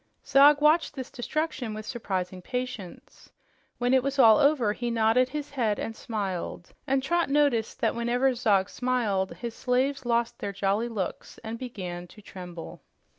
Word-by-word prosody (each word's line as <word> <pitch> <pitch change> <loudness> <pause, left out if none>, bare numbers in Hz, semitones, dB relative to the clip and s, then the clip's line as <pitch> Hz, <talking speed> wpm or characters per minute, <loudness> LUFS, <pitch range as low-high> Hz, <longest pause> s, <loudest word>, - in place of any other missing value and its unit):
Zog 285 +2 +6
watched 310 +3 +3
this 260 -1 -6
destruction 260 -3 -3
with 215 0 -7
surprising 185 -6 -4
patience. 250 -4 -6 0.5
When 245 +1 +1
it 260 - +5
was 275 +2 -2
all 225 -5 +7
over, 280 -8 +3
he 240 +2 -3
nodded 230 +2 +3
his 295 +1 -5
head 225 -7 0
and 225 - -4
smiled, 190 -6 -4
and 265 0 +1
Trot 340 +3 +1
noticed 275 -6 +1
that - - +2
whenever 245 +3 +1
Zog 210 -6 +2
smiled, 225 -7 0
his 235 -2 -6
slaves 260 +3 0
lost 235 -1 0
their 200 - -4
jolly 200 +4 0
looks 200 -6 -5
and 225 +1 -5
began 180 -8 -6
to 210 - -16
tremble. 175 -4 -9
235 Hz, 160 wpm, -27 LUFS, 205-265 Hz, 0.5 s, all